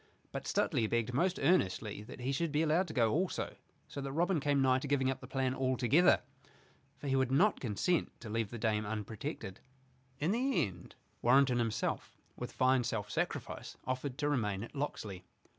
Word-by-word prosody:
But -, -, -5 dB
Stuteley 110 Hz, -, +1 dB
begged 120 Hz, 0 st, 0 dB
most 175 Hz, +8 st, +2 dB
earnestly 110 Hz, -, +1 dB
that 125 Hz, -, -10 dB
he 130 Hz, +2 st, -1 dB
should 160 Hz, +3 st, 0 dB
be 150 Hz, +2 st, +2 dB
allowed 165 Hz, +4 st, +2 dB
to 155 Hz, -, -7 dB
go 115 Hz, -3 st, +3 dB
also, 180 Hz, +4 st, -1 dB, 0.3 s
so 140 Hz, -, -6 dB
that 135 Hz, 0 st, -4 dB
Robin 170 Hz, +3 st, +2 dB
came 145 Hz, 0 st, +2 dB
nigh 130 Hz, -1 st, +4 dB
to 140 Hz, -, -5 dB
giving 135 Hz, -2 st, +2 dB
up 135 Hz, -, -5 dB
the 130 Hz, -, -9 dB
plan 130 Hz, -1 st, 0 dB
all 130 Hz, -1 st, 0 dB
together. 140 Hz, +9 st, +5 dB, 0.8 s
For 145 Hz, -, -7 dB
he 135 Hz, -, +2 dB
would 130 Hz, -1 st, +2 dB
not 190 Hz, +10 st, +4 dB
consent 130 Hz, -, 0 dB
to 120 Hz, -, -8 dB
leave 110 Hz, -1 st, -1 dB
the 120 Hz, -, -6 dB
dame 110 Hz, -1 st, +1 dB
unprotected. 105 Hz, -2 st, -5 dB, 0.6 s
In 155 Hz, +6 st, 0 dB
the 255 Hz, +5 st, +2 dB
end 90 Hz, -3 st, -10 dB, 0.3 s
Warrenton 125 Hz, 0 st, +5 dB
himself, 115 Hz, -2 st, -2 dB, 0.2 s
with -, -, -6 dB
fine 130 Hz, -1 st, +3 dB
self 115 Hz, -4 st, -3 dB
sacrifice, -, -, -3 dB
offered 130 Hz, +1 st, -3 dB
to 150 Hz, -1 st, 0 dB
remain 105 Hz, -8 st, 0 dB
at 115 Hz, -, -9 dB
Locksley. 110 Hz, -10 st, -4 dB
130 Hz, 190 wpm, -33 LUFS, 115-145 Hz, 0.8 s, together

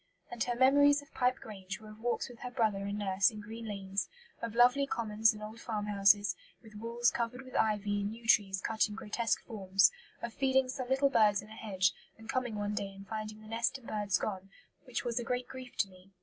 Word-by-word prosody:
And 240 Hz, -2 st, -1 dB
her 245 Hz, -, -1 dB
memories 285 Hz, +3 st, +5 dB
of 285 Hz, -, -22 dB
Pipe 250 Hz, 0 st, +2 dB
Grange 195 Hz, -2 st, -7 dB
were 215 Hz, -1 st, -11 dB
of 215 Hz, -, -14 dB
walks 240 Hz, +1 st, -1 dB
with 245 Hz, -2 st, -13 dB
her 250 Hz, -, -5 dB
brother 215 Hz, -5 st, 0 dB
and 200 Hz, +1 st, -3 dB
nurse 195 Hz, 0 st, +3 dB
in 215 Hz, -2 st, -9 dB
green 225 Hz, +2 st, -8 dB
lanes; 195 Hz, -1 st, -3 dB, 0.3 s
of 230 Hz, -1 st, -4 dB
lovely 250 Hz, +4 st, +5 dB
commons 220 Hz, -3 st, +2 dB
and 215 Hz, -1 st, -9 dB
old 220 Hz, +2 st, -8 dB
farmhouses, 205 Hz, -2 st, +3 dB, 0.3 s
with 220 Hz, -1 st, -14 dB
walls 235 Hz, +3 st, +1 dB
covered 240 Hz, +2 st, -3 dB
with 255 Hz, -1 st, -12 dB
ivy 205 Hz, -1 st, +1 dB
and 200 Hz, +1 st, -2 dB
yew 230 Hz, 0 st, -14 dB
trees 195 Hz, -4 st, +3 dB
cut 220 Hz, 0 st, +1 dB
in 210 Hz, -, -7 dB
grotesque 220 Hz, +2 st, -1 dB
forms; 195 Hz, -3 st, +3 dB, 0.3 s
of 235 Hz, -1 st, -5 dB
"feeding 265 Hz, 0 st, +2 dB
some 255 Hz, -1 st, -4 dB
little 270 Hz, +1 st, +3 dB
birds 210 Hz, -5 st, +4 dB
in 210 Hz, -, -14 dB
a 220 Hz, -, -10 dB
hedge, 200 Hz, -3 st, +1 dB, 0.2 s
and 225 Hz, 0 st, -14 dB
coming 250 Hz, -4 st, -1 dB
one 205 Hz, 0 st, -2 dB
day 200 Hz, -1 st, -3 dB
and 195 Hz, 0 st, -12 dB
finding 215 Hz, 0 st, -5 dB
the -, -, -12 dB
nest 230 Hz, +5 st, 0 dB
and 260 Hz, -, -18 dB
birds 205 Hz, -3 st, 0 dB
gone, 195 Hz, -2 st, -4 dB, 0.4 s
which 250 Hz, -3 st, -3 dB
was 240 Hz, 0 st, 0 dB
a -, -, -3 dB
great 250 Hz, +1 st, -2 dB
grief 255 Hz, -1 st, -10 dB
to 200 Hz, -, +2 dB
me." 185 Hz, 0 st, -18 dB
220 Hz, 225 wpm, -32 LUFS, 205-245 Hz, 0.4 s, memories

